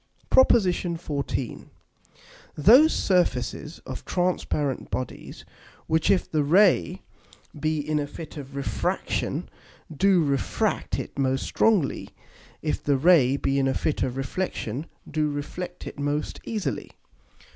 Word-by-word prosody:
PROP. 260 - +7
XIV. 170 - -1 0.9
_Those 245 - +7
Surfaces 160 - 0
of - - -7
transparent 175 -6 -1
Bodies, 130 -1 -6 0.4
which 160 0 +1
if 185 - +3
the 155 -2 0
Ray 165 - +3 0.6
be 155 +1 0
in 155 -1 +1
a 145 - -2
Fit 160 +2 -9
of 140 -2 -9
Refraction 140 0 -2 0.5
do 190 +1 +4
refract 140 -3 -1
it - - -6
most 135 0 +1
strongly, 205 -11 +1 0.5
if 75 - -1
the 145 -1 +2
Ray 140 -4 +5
be 140 0 0
in 135 - +2
a 130 - 0
Fit 155 - -1
of 130 0 -1
Reflexion 135 - -3 0.2
do 155 -1 0
reflect 165 +5 -6
it - - -8
most 145 +1 -2
easily. 215 -4 -3
150 Hz, 125 wpm, -25 LUFS, 135-180 Hz, 0.9 s, PROP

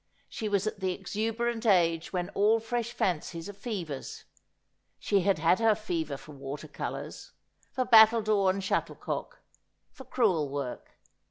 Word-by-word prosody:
She 215 - -4
was 200 -1 +1
at 215 - -3
the 185 -1 0
exuberant 225 +4 -2
age 170 -6 +2
when 180 -2 -2
all 215 +3 +3
fresh 235 +1 -3
fancies 170 -4 -2
are 205 - -7
fevers. 185 - -6 0.7
She 200 - +1
had 195 0 +2
had 165 +5 +3
her 225 -2 +4
fever 165 -9 -3
for 135 +3 -13
water 140 +1 -7
colours, - - -6 0.4
for 255 -2 -1
battledore 220 -4 +6
and 195 +1 -1
shuttlecock, 190 - -3 0.5
for 265 - -13
crewel 180 - +1
work. 140 -3 -6
195 Hz, 145 wpm, -29 LUFS, 165-225 Hz, 0.7 s, battledore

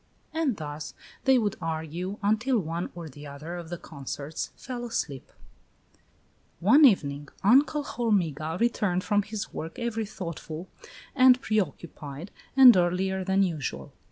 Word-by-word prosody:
And 315 -8 0
thus 150 -1 -6 0.3
they 265 -1 +6
would 210 -4 0
argue 165 +4 -4
until 225 +5 +2
one 170 -2 -3
or 170 -2 -7
the 145 0 -11
other 150 +5 -7
of 170 -2 -7
the 175 - -4
consorts 145 0 -6
fell 245 -2 -6
asleep. 160 - -4 0.6
II. - - -32 0.6
One 270 - +7
evening 145 - +2
Uncle 280 +7 +4
Hormiga 170 - -1
returned 205 -6 +1
from 205 0 +2
his 210 +1 -6
work 160 +1 -6
every 225 -2 -2
thoughtful 170 -3 -7 0.5
and 255 -1 +6
preoccupied, 170 - -3 0.3
and 255 -3 +10
earlier 185 +2 +1
than 190 +1 +2
usual. 145 - -3
185 Hz, 135 wpm, -27 LUFS, 160-225 Hz, 0.6 s, and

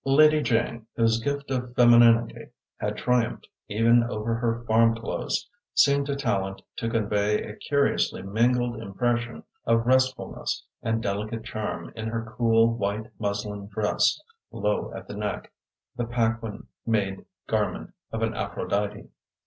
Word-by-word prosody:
Lady 150 +3 +5
Jane, 115 -2 0
whose 115 -1 +3
gift 140 -1 -2
of 125 -1 -3
femininity 120 -1 +5 0.3
had - - -3
triumphed 125 -2 0 0.2
even 115 +3 +4
over 115 -1 -2
her 115 0 -1
farm 115 0 +4
clothes, 115 - -3 0.3
seemed 140 0 +4
to 140 - -1
Tallente 100 -8 -2
to 115 - -2
convey 105 -2 +1
a 105 - -8
curiously 140 -6 0
mingled 120 +3 +1
impression 120 +3 -2 0.2
of 115 0 +2
restfulness 130 +1 0 0.2
and 115 0 -1
delicate 105 +3 -3
charm 110 -1 -5
in 110 -1 -4
her 110 0 -4
cool, 115 0 +4
white 105 0 -3
muslin 105 -1 -3
dress, 105 +1 +1 0.3
low 105 +1 -1
at - - -8
the - - -7
neck, 105 -1 -4 0.4
the 120 -1 -2
Paquin 115 -2 -1 0.2
made 100 -4 -1 0.2
garment - - -1 0.2
of 115 0 -2
an 110 0 0
Aphrodite. 105 0 -2
115 Hz, 135 wpm, -26 LUFS, 105-120 Hz, 0.4 s, Lady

